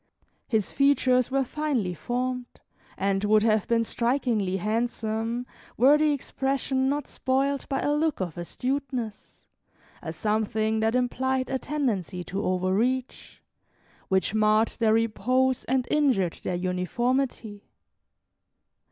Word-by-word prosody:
His 220 -4 0
features 260 -3 +3
were 270 +1 +1
finely 260 -9 -1
formed, 250 +7 -3 0.4
and 195 0 0
would 215 0 +4
have 215 -2 +2
been 230 -1 +2
strikingly 235 -5 0
handsome, 225 +2 -2 0.3
were 265 +5 +6
the 305 0 +3
expression 270 -1 -1
not 290 0 -1
spoiled 270 +1 -1
by 270 -1 -1
a 290 - +1
look 310 +1 0
of 175 -5 -3
astuteness, 250 +4 -4 0.6
a 160 - -5
something 215 +4 0
that 220 +2 +1
implied 255 +1 0
a 265 - 0
tendency 215 - -2
to 195 +3 -4
overreach, 200 +8 -1 0.6
which 190 +1 +1
marred 215 +1 +3
their 220 -2 +3
repose 250 +4 +1
and 255 -1 0
injured 255 - +2
their 180 - -2
uniformity. 205 +5 -2
235 Hz, 115 wpm, -26 LUFS, 210-265 Hz, 0.6 s, were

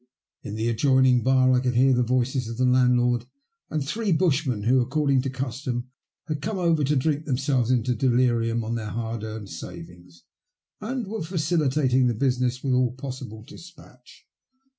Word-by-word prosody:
In 105 - -7
the 110 +1 -1
adjoining 130 +1 +3
bar 130 +1 +3
I 125 - +4
could 125 -1 -1
hear 130 +2 +4
the 125 - +2
voices 125 +1 0
of 115 - -6
the 130 - +2
landlord 125 -1 +2 0.4
and 155 -3 -2
three 215 +5 -1
bushmen 145 - +1
who, 125 +3 +3
according 140 +1 +1
to 135 - -3
custom, 130 -1 -4 0.3
had 155 -3 -4
come 210 0 -3
over 165 -4 +2
to 145 +2 +1
drink 150 +2 0
themselves 130 -3 0
into 125 -1 +1
delirium 120 -2 +1
on 110 +1 -3
their 110 -2 -4
hard 115 0 -4
earned 110 -2 -7
savings, 85 +1 -10 0.6
and 240 +3 -4
were 220 +2 -5
facilitating 150 -6 +1
the 120 - 0
business 125 0 0
with 135 -2 0
all 125 -1 +2
possible 130 -4 -8
despatch. 150 -4 -16
130 Hz, 165 wpm, -25 LUFS, 120-140 Hz, 0.6 s, I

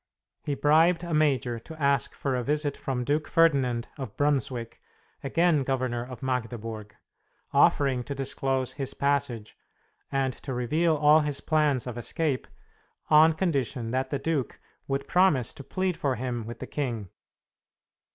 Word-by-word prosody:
He 145 - -2
bribed 165 +5 +4
a 170 -1 -4
major 135 -6 +1
to 160 +7 -12
ask 140 -3 +1
for 135 -2 -1
a 125 - 0
visit 145 +1 0
from 125 -2 -3
Duke 150 +4 0
Ferdinand 135 -8 +2
of 130 -7 -6
Brunswick, 130 -5 -1 0.4
again 165 +2 +2
Governor 130 -3 -1
of 125 +2 -9
Magdeburg, 115 -4 -4 0.6
offering 135 -3 +3
to 140 - -4
disclose 135 -1 -2
his 135 -1 -4
passage, 130 -6 -1 0.6
and 135 -2 0
to 130 0 -6
reveal 155 +7 +1
all 150 +1 +5
his 150 -2 -2
plans 150 -6 +1
of 120 -1 -5
escape, 145 +2 -2 0.6
on 155 +1 +7
condition 140 -8 -1
that 130 +1 -1
the 140 - -1
duke 150 -3 -2 0.3
would 140 0 -2
promise 170 -10 +3
to 140 - -10
plead 185 +5 -1
for 135 -5 -1
him 120 -2 -4
with 120 0 -7
the - - -6
king. 120 -9 -3
135 Hz, 150 wpm, -27 LUFS, 125-150 Hz, 0.6 s, on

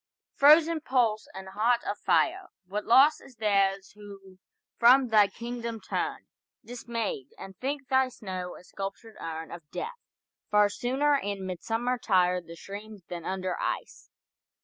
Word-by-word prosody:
frozen 315 +3 +6
pulse 235 -7 +1
and 190 0 -8
heart 230 +5 +1
of - - -2
fire, 375 +2 +1 0.2
What 205 +3 -4
loss 270 +6 +6
is 260 - -16
theirs 195 -3 +1
who 195 -2 -13 0.4
from 250 +2 +6
thy 210 -2 +6
kingdom 235 0 -6
turn 190 - -3 0.4
Dismayed, 230 - -4
and 190 0 -10
think 280 +1 -3
thy 265 -1 +3
snow 185 -6 -6
a - - -14
sculptured 195 +4 -7
urn 160 0 -6
Of 170 -4 -10
death! 480 +1 -6 0.5
Far 210 0 +4
sooner 265 +7 +1
in 200 -6 -4
midsummer 225 +7 -2
tire 180 -4 +2
The 170 0 -11
streams 205 +2 -9
than 175 -2 -6
under 185 -1 -3
ice. - - -4
215 Hz, 145 wpm, -28 LUFS, 190-245 Hz, 0.5 s, frozen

